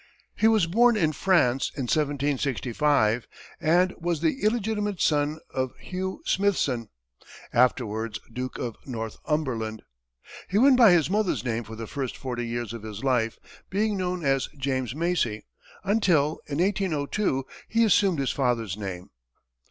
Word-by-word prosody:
He 220 - +3
was 220 -5 +4
born 235 +7 +4
in 160 -6 +2
France 135 -6 +2
in 140 - -3
1765, 140 -3 +1 0.3
and 180 +4 +3
was 170 -2 -1
the 165 - 0
illegitimate 210 -3 0
son 150 0 +1
of 130 -1 -2
Hugh 190 +1 -5
Smithson, 145 - +1 0.6
afterwards 115 -3 +1
Duke 125 +1 -4
of 120 -2 -4
Northumberland. 115 -1 -3 0.7
He 195 - +1
went 265 +4 +6
by 225 -6 +8
his 165 -4 +3
mother's 185 - 0
name 120 -1 -1
for 110 +1 -9
the 115 +1 -6
first 135 +1 -4
forty 120 -2 -4
years 120 -1 -3
of 115 - -7
his 110 +1 -7
life, 120 -4 +1 0.3
being 210 +2 0
known 180 -3 -2
as 135 -1 +1
James 130 -3 -2
Macie, 155 -10 0 0.4
until, 180 -8 +2
in 140 - -3
1802, 180 -5 0 0.2
he 230 +1 +2
assumed 195 -4 +3
his 135 -2 0
father's 120 -7 0
name. 95 -4 -6
145 Hz, 140 wpm, -26 LUFS, 120-185 Hz, 0.7 s, by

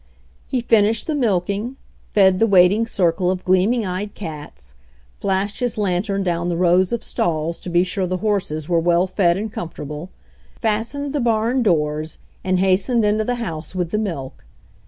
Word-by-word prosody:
He 255 - -1
finished 225 -1 +3
the 315 - -1
milking, 210 -1 0 0.3
fed 190 -2 +4
the 225 - +4
waiting 200 +3 +4
circle 180 -4 +1
of 185 0 -2
gleaming 200 +6 +2
eyed 190 +3 -4
cats, 145 - -9 0.5
flashed 195 +1 -1
his 245 -3 -1
lantern 195 0 0
down 175 -1 -1
the 170 - -1
rows 180 +1 +3
of 235 -1 -2
stalls 165 0 -1
to - - -7
be 175 +1 +3
sure 185 0 -2
the 185 +1 -1
horses 180 -7 -1
were 170 -1 +2
well 175 +2 +3
fed 185 -2 +2
and 210 +1 -4
comfortable, 150 0 -6 0.5
fastened 230 +6 -2
the 295 - 0
barn 235 +2 +1
doors 155 -6 0 0.3
and 185 0 +1
hastened 195 +5 +2
into 210 +1 +2
the 245 +3 -1
house 165 -8 -5
with 175 -2 -2
the 210 - 0
milk. 165 -11 -5
190 Hz, 170 wpm, -21 LUFS, 175-215 Hz, 0.5 s, fed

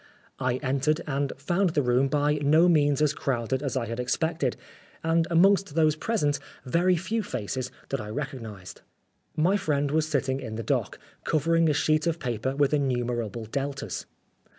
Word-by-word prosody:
I 130 -2 0
entered, 140 +4 +1
and 140 -1 -1
found 175 +5 0
the 145 - +3
room 125 +2 +3
by 150 +1 +1
no 155 +4 +5
means 145 -4 +3
as 150 -1 +2
crowded 130 -3 -1
as 140 -2 -2
I 120 - -1
had 115 +1 -5
expected, 150 +1 -1 0.5
and 165 0 +2
amongst 185 -1 +4
those 155 -2 +3
present 155 -6 0 0.3
very 175 +7 +3
few 190 +7 -1
faces 130 - -4 0.2
that 135 - -2
I 105 - -7
recog 135 +2 -4
nised. 105 -5 -9 0.6
My 180 +6 +3
friend 145 -6 0
was 155 0 +1
sitting 135 -3 0
in 115 -5 -6
the 115 - -4
dock, - - -1 0.3
covering 165 +2 +2
a - - +3
sheet 155 +2 +2
of 165 -1 0
paper 125 -2 -2
with 145 0 +2
innumerable 120 -5 -1
Deltas. 140 +4 -4
145 Hz, 170 wpm, -27 LUFS, 130-160 Hz, 0.6 s, no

